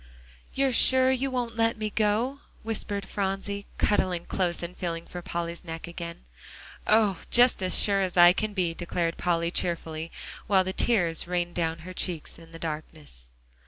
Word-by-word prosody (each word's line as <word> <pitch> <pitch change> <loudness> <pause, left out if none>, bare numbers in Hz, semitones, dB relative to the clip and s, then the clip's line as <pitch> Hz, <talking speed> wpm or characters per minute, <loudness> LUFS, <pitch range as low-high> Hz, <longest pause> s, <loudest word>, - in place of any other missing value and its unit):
"You're 270 -1 +2
sure 260 +2 +5
you 265 +1 0
won't 245 -3 -3
let 230 0 +1
me 215 -1 -3
go?" 225 +6 0 0.2
whispered 205 -2 -2
Phronsie, 200 +1 -3
cuddling 180 -4 +1
close, 175 -2 -1
and 175 +1 -6
feeling 170 -2 -4
for 175 - -8
Polly's 170 0 -4
neck 165 -2 -6
again. 170 - -8 0.6
"Oh! 210 -4 +3
just 245 -3 +5
as 185 -1 +3
sure 200 -1 +5
as 185 -1 -2
I 175 0 +8
can 215 +1 -3
be," 175 -3 0
declared 170 0 -2
Polly 170 -1 0
cheerfully, 165 -2 -2 0.4
while 190 -2 +4
the 190 0 -4
tears 175 -10 +2
rained 175 -1 -1
down 165 -1 -1
her 185 - -7
cheek 175 -4 -1
in 165 -1 -15
the 165 - -9
darkness. 155 - -7
180 Hz, 165 wpm, -27 LUFS, 170-210 Hz, 0.6 s, I